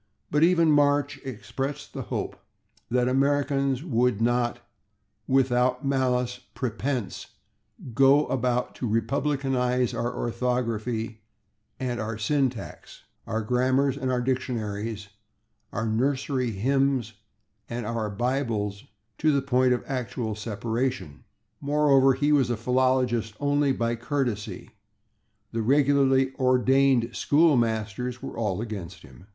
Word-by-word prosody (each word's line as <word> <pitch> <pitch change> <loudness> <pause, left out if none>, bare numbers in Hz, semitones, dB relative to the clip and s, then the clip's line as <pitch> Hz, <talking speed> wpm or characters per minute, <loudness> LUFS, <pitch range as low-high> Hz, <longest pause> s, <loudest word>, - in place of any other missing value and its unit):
But 150 - +2
even 165 -1 +5
Marsh 145 -1 +2
expressed 130 +3 -5
the - - -4
hope - - -4 0.5
that 125 +1 +2
Americans 140 0 +1
would 125 - +1
not, 120 0 +1 0.7
"with 135 -1 +3
malice 125 0 +1 0.2
prepense, 125 -3 -3 0.7
go 135 +4 +5
about 125 -1 -1
to 120 - -2
republicanize 125 +1 0
our 120 +1 -1
orthography 115 -2 -2 0.6
and 125 -2 -2
our 110 0 -3
syntax, 130 +1 -2 0.2
our 110 0 -2
grammars 130 +4 +2
and 130 0 -2
our 125 -1 0
dictionaries, 110 -5 -3 0.6
our 110 - -2
nursery 130 +2 0
hymns 130 +3 +1
(/sic/) - - -20 0.6
and 120 -1 -4
our 110 -1 -2
Bibles" 110 -3 -2 0.3
to 155 - +3
the 140 -2 +1
point 130 -1 +2
of 125 - 0
actual 125 -4 -3
separation. 110 - -3 0.3
Moreover, 140 -2 +4
he 145 +3 +1
was 135 -5 +3
a 120 - -1
philologist 125 -2 +1
only 145 -1 +2
by 120 -2 0
courtesy; 120 -4 -3 0.8
the 115 - -2
regularly 135 +1 +3
ordained 130 -1 +3
school 155 +1 +4
masters 115 +1 -1
were - - -6
all 105 -3 -1
against 100 -6 -7
him. 65 +8 -16
125 Hz, 115 wpm, -26 LUFS, 115-135 Hz, 0.8 s, even